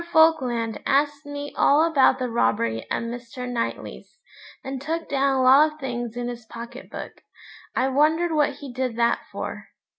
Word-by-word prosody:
Falkland 255 -9 +3
asked 290 +1 +1
me 285 0 -6
all 295 +3 +4
about 280 -5 +4
the 255 -1 -2
robbery 115 - 0
at - - -1
Mr. 240 +1 -6
Knightley's, 240 -2 -5 0.5
and 265 -1 -5
took 325 +3 -3
down 275 -1 +1
a 260 - +2
lot 280 +4 +6
of 305 - -20
things 240 -3 -4
in 245 0 -3
his 240 -1 -6
pocket 235 +3 -9
book. - - -8 0.5
I 260 - +2
wondered 310 +5 +2
what 295 -3 +2
he 280 -3 -9
did 255 -2 -2
that 235 0 +2
for. - - -6
265 Hz, 170 wpm, -24 LUFS, 240-290 Hz, 0.5 s, lot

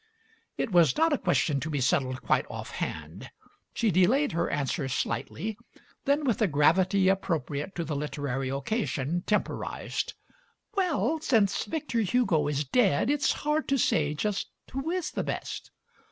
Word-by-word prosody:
It - - -1
was 175 - +5
not 320 0 +4
a - - +3
question 165 -5 +1
to 155 - -4
be 145 -2 -1
settled 130 -2 +1
quite - - +2
offhand; - - -6 0.4
she 225 -3 +1
delayed 235 - +3
her 170 +1 0
answer 145 +1 -1
slightly, 210 - -3 0.5
then, 285 +2 +2
with 240 -5 0
a 215 - +5
gravity 185 +6 +3
appropriate 165 -4 -1
to 170 - -2
the 155 -2 -3
literary 140 -2 -2
occasion, 145 - -1
temporized: 210 - -2 0.6
"Well, 335 -4 +1
since 220 -10 +2
Victor 300 -7 -2
Hugo 195 -8 +2
is 145 0 0
dead* 200 - +3
it's 290 -1 +2
hard 300 +1 +1
to 275 - +2
say 150 - +2
just 205 +5 -2 0.2
who 270 +4 -3
is 360 -1 -1
the - - -2
best." - - -4
185 Hz, 150 wpm, -28 LUFS, -, 0.6 s, was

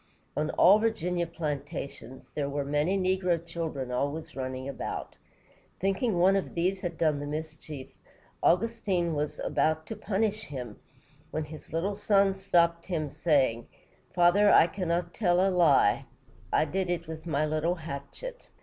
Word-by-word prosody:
On 155 +1 0
all 200 +4 +7
Virginia 180 -6 0
plantations, 140 -5 -6
there 140 -2 -2
were 140 0 -2
many 150 +7 +1
negro 185 -2 +1
children 160 -6 -4
always 140 +5 -2
running 130 0 -4
about. 140 - -5 0.6
Thinking 195 +2 0
one 185 +3 +5
of 195 - -2
these 185 +3 0
had 170 -2 -4
done 155 -3 +2
the 145 - -5
mischief, 155 -2 -6 0.5
Augustine 185 -3 +1
Washington - - -2
was 150 0 -2
about 160 0 +1
to 220 - -6
punish 215 +1 -1
him, 125 -6 -7 0.5
when 155 0 -2
his 150 +1 -11
little 170 +5 -1
son 200 -1 +3
stopped 170 -3 +2
him, 155 -6 -2
saying: 135 -8 +1 0.4
"Father, 180 +4 +5
I - - +7
cannot 175 -1 -2
tell 180 -4 +2
a 190 +1 +3
lie; 150 - +4 0.5
I - - +3
did 185 +4 -2
it 170 -2 -2
with 160 +1 -7
my 150 -1 +1
little 155 +3 0
hatchet." 165 - -8
170 Hz, 150 wpm, -29 LUFS, 150-190 Hz, 0.6 s, all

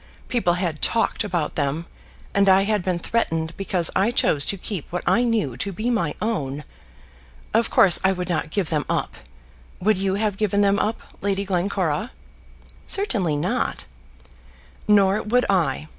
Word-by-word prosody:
People 225 -8 +1
had 175 -4 -3
talked 230 -1 +1
about 175 -6 -2
them, 145 +3 -2 0.5
and 200 -1 +3
I 190 +1 +5
had 210 0 0
been 180 -1 -1
threatened 165 -5 -1
because 185 -4 +2
I 200 +4 +3
chose 150 - +1
to 200 - 0
keep 185 -3 -6
what 180 - -3
I 235 - +3
knew 225 - 0
to 200 +10 -3
be 215 +7 -2
my 170 -11 -1
own. 150 -10 -2 0.9
Of 225 +2 +2
course, 185 - +6
I 190 - +4
would 180 -1 -3
not 160 -3 -2
give 180 0 -2
them 150 -2 +1
up. - - -1 0.7
Would 210 +1 +2
you 195 0 0
have 205 -1 -1
given 205 -1 +1
them 200 0 +3
up, 220 +2 -1 0.2
Lady 200 0 -1
Glencora?" 190 +1 -1 0.8
"Certainly 215 - 0
not." 145 - -2 1.0
"Nor 200 -1 +4
would 245 +4 +1
I. 155 -5 0
190 Hz, 160 wpm, -23 LUFS, 170-210 Hz, 1.0 s, course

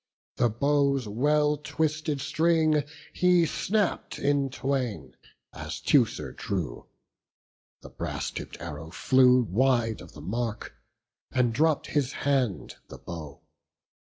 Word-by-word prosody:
The 120 - +3
bow's 140 +1 +1
well 150 +7 +2
twisted 155 -1 -2
string 155 0 +2 0.3
he 180 -2 +4
snapp'd 205 +4 -1
in 140 -1 +1
twain, 130 -4 -3 0.4
As - - -6
Teucer 125 -3 +2
drew; 95 -8 -4 0.9
the - - -11
brass - - -4
tipp'd - - -7
arrow 75 +2 -7
flew 125 +6 +4
Wide 115 +1 +1
of 85 - -13
the 75 - -11
mark, 110 +5 -3 0.6
and 125 -3 +2
dropp'd 155 +3 +2
his 145 -3 +1
hand 130 -8 0
the - - -10
bow. 75 -4 -9
135 Hz, 115 wpm, -27 LUFS, 115-150 Hz, 0.9 s, he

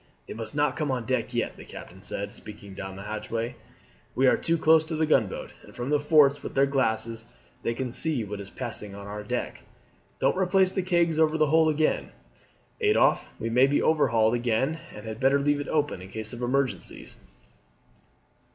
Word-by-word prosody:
"They - - -6
must 115 +4 -6
not 145 -2 +1
come 150 -2 -2
on 125 -3 -1
deck - - -1
yet," - - -2
the - - -10
captain 95 +2 -11
said, 100 0 -4
speaking 105 -2 -11
down 95 0 -7
the 100 - -8
hatchway. 115 +3 -4 0.6
"We 130 - +3
are 130 - +6
too 165 0 0
close 160 0 +5
to 160 0 -4
the 160 +1 +1
gunboat, 125 -10 0
and - - -16
from 125 +3 -4
the 150 - +3
forts 145 -1 +4
with - - -7
their 135 0 +5
glasses 115 -4 -1 0.4
they 115 - -1
can 125 0 -3
see 145 -2 +1
what 105 0 -6
is 100 - -9
passing 100 0 -4
on 100 0 -9
our 105 +1 -6
deck. 105 - -4 0.6
Don't - - +2
replace 185 0 +3
the 190 - -1
kegs 170 -3 +1
over 160 0 +3
the 155 - +4
hole 160 +2 +4
again, 155 0 0 0.7
Adolphe; 425 0 +3
we 115 - -3
may 125 +3 +5
be 145 - +2
overhauled 115 -8 +3
again, 120 +6 0
and 105 - -10
had 110 0 -6
better 135 +2 +4
leave 145 +1 +1
it 145 - -4
open 145 - 0
in 95 - -10
case 110 +2 -5
of 120 - -7
emergencies." 130 +2 -2
130 Hz, 195 wpm, -27 LUFS, 110-155 Hz, 0.7 s, are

